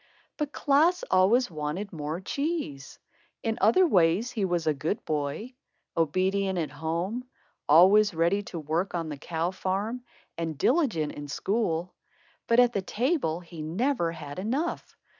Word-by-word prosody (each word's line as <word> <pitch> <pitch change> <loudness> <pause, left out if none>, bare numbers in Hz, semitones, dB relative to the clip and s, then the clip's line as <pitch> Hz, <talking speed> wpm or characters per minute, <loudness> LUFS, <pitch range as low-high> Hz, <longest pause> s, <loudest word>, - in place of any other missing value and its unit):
But 300 -2 -2
Klaas 310 +7 +3
always 200 +5 +4
wanted 155 +6 -4
more 155 +1 -4
cheese. 280 - -3 0.5
In 225 -1 -1
other 230 - +5
ways, 190 - +3
he 215 -5 -1
was 175 -3 -1
a 155 - +3
good 155 +8 -3
boy, 155 - -3 0.4
obedient 190 +4 +1
at 160 -3 -2
home, 175 +10 -3 0.4
always 190 +5 +6
ready 170 +5 +2
to 175 - -7
work 165 +5 -2
on 165 -2 -2
the 145 - -5
cow 165 +4 -2
farm, 200 +6 -2 0.4
and 160 -3 -3
diligent 235 - +1
in 145 0 -8
school. 180 +1 -1 0.5
But 230 +1 +4
at 245 -1 +5
the 200 - 0
table 215 - -1
he 170 -2 -10
never 175 - 0
had 150 -1 -8
enough. 265 - -3
185 Hz, 145 wpm, -27 LUFS, 160-230 Hz, 0.5 s, always